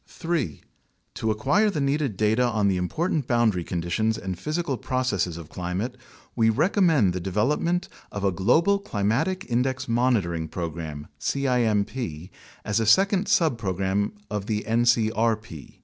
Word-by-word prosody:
3. 160 - -3 0.5
To 110 - -2
acquire 180 - +2
the 190 - -2
needed 140 -6 0
data 110 +3 +2
on 110 -4 +1
the 95 -2 +2
important 150 - -1
boundary 115 -7 +2
conditions 90 +7 -1
and 95 -1 -4
physical 155 - -2
processes 120 -10 -1
of 85 -3 -9
climate, 90 +8 -3 0.4
we 115 -2 +3
recommend 155 - +3
the 90 - -2
development 130 - 0 0.2
of 100 - -5
a 100 - +3
global 165 - +3
Climatic 120 - -1
Index 130 +2 -1
Monitoring 110 -9 +1
Program 80 -3 -5
(cimp) 120 - +1 0.7
as 105 +2 +1
a 115 - +1
second 195 - +4
subpro 115 - +1
gram 100 +1 0
of 105 -1 -4
the 105 -1 -2
ncrp. 115 - +1
110 Hz, 135 wpm, -25 LUFS, 95-135 Hz, 0.7 s, second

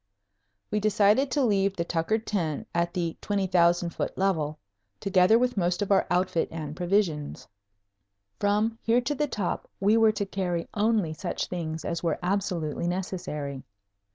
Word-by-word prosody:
We 210 - +1
decided 210 +5 +3
to 285 +1 +1
leave 200 -4 +2
the 170 - -1
Tucker 170 +6 0
tent 185 -9 -2
at 170 0 +1
the 170 -2 -2
20,000 175 -3 +2
foot - - -4
level, 160 -6 0 0.4
together 195 +2 +4
with 245 -1 0
most 180 +1 +1
of 205 - -4
our 195 - +4
outfit 180 -1 +1
and 155 -2 -5
provisions. 175 -4 -1 0.9
From 210 +3 +1
here 235 +2 +3
to 245 +4 -1
the 295 +1 0
top 205 -9 -3
we 205 +3 +4
were 225 -1 +5
to 205 - -2
carry 180 -3 -2
only 210 -6 +1
such 175 +2 -3
things 160 -3 -4
as 170 - -2
were 170 - 0
absolutely 175 -4 -1
necessary. 175 -7 -4
185 Hz, 155 wpm, -27 LUFS, 170-210 Hz, 0.9 s, were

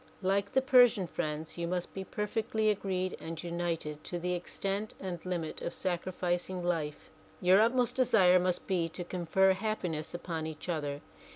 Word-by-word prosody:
Like 200 +2 +1
the 265 - +3
Persian 245 -7 +6
friends 155 0 -4
you 170 - -1
must 180 0 -2
be 190 - -4
per 210 +2 -3
fectly 220 0 +1
agreed 185 -2 -2
and 165 0 -6
united 170 -3 -3
to 175 - -3
the 180 +1 -1
extent 195 +4 -3
and 180 -3 -5
limit 170 -4 -3
of - - -3
sacrificing 180 0 -2
life. 160 -4 -2 0.3
Your 185 +3 +6
utmost 245 +2 +2
desire 190 -8 +5
must 180 0 0
be 175 -4 0
to 175 +2 -5
confer 185 +2 +2
happiness 185 -7 -3
upon 165 -2 -3
each 155 +1 -8
other. 145 -3 -2
180 Hz, 165 wpm, -31 LUFS, 170-195 Hz, 0.3 s, Persian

